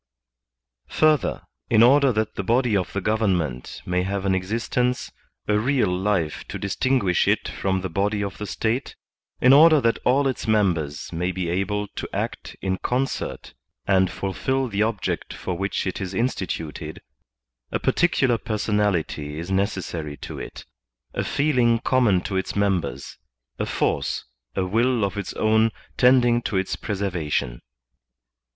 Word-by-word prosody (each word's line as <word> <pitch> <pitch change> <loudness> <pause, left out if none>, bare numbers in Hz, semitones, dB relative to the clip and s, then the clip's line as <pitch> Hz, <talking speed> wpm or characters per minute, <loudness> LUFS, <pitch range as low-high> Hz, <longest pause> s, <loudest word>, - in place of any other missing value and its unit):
Further, 155 -2 +2 0.3
in 110 - +6
order 135 +2 +6
that 110 -1 -1
the - - -3
body 115 +2 +2
of 95 -3 0
the 100 - -2
government 90 - -1
may 90 0 0
have 95 +1 -2
an 95 - +2
existence, 115 +6 -1 0.4
a 105 - +2
leal 110 -3 +2
life 90 -5 -1
to - - -5
distinguish 100 -2 +1
it - - +2
from 95 -1 -1
the 95 - -2
body 100 +4 0
of 100 -2 -5
the 105 - -4
State; 115 +7 -2 0.5
in 130 +2 +7
order 155 +2 +8
that 115 -3 +1
all 135 +3 +3
its 130 -3 -3
members 90 -10 0
may 90 +2 -1
be 90 -2 -3
able 105 +3 -1
to - - -6
act - - -4
in 95 -1 0
concert 130 - -2 0.3
and 95 -2 +3
fulfill 130 +9 -1
the 100 -3 -2
object 105 -5 -1
for 90 - -4
which 95 +3 -2
it 95 +1 -3
is 95 0 -4
instituted, 95 -9 -3 0.7
a - - +1
particular 130 -9 +2
personality 105 -9 -1
is 85 +4 -5
necessary 90 -6 -2
to - - -7
it, - - -8 0.5
a - - -1
feeling 125 -5 +2
common 115 -6 +2
to 95 - -4
its 95 - -3
members, 95 -10 -1 0.4
a - - -1
force, - - -1 0.3
a 95 - 0
will 115 +4 +2
of 100 - -1
its 100 - -4
own 110 +1 +3 0.3
tending 125 -2 +4
to 105 - -2
its 95 0 -1
preservation. 90 - -2
100 Hz, 150 wpm, -24 LUFS, 95-120 Hz, 0.7 s, order